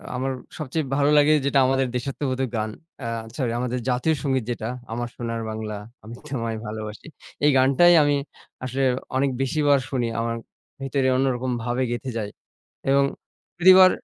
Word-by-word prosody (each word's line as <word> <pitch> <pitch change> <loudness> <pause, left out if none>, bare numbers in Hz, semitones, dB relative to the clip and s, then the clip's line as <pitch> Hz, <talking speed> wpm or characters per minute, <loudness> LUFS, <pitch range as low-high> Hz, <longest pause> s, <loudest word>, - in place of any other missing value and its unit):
আমার 135 +1 -1 0.3
সবচেয়ে 155 0 -2
ভালো 145 0 +3
লাগে 150 +1 +6
যেটা, 140 -1 +3
আমাদের 135 0 +2
দেশাত্মবোধক 130 +1 -2
গান, 110 0 -1 0.4
আ - - -2 0.3
সরি, 125 -5 -1
আমাদের 125 0 -1
জাতীয় 125 +6 +2
সঙ্গীত 130 -4 +1
যেটা 110 -2 -4 0.2
"আমার 120 +1 -2
সোনার 115 -1 -3
বাংলা, 110 -1 -4 0.3
আমি 110 - -9
তোমায় 115 -5 -3
ভালোবাসি"। 110 +2 -6 0.4
এই 150 - +6
গানটাই 140 +7 +6
আমি 145 0 +3 0.5
আসলে 130 +2 -1 0.3
অনেক 135 +1 +2
বেশিবার 145 +1 +3
শুনি, 125 -4 0
আমার 115 0 -1 0.5
ভেতরে 135 0 0
অন্যরকম 130 -1 0
ভাবে 120 +2 -1
গেঁথে 130 +2 -3
যায় 105 -2 -3 0.6
এবং 140 +1 +5 0.5
প্রতিবার 185 +1 +8
130 Hz, 150 wpm, -24 LUFS, 120-140 Hz, 0.6 s, প্রতিবার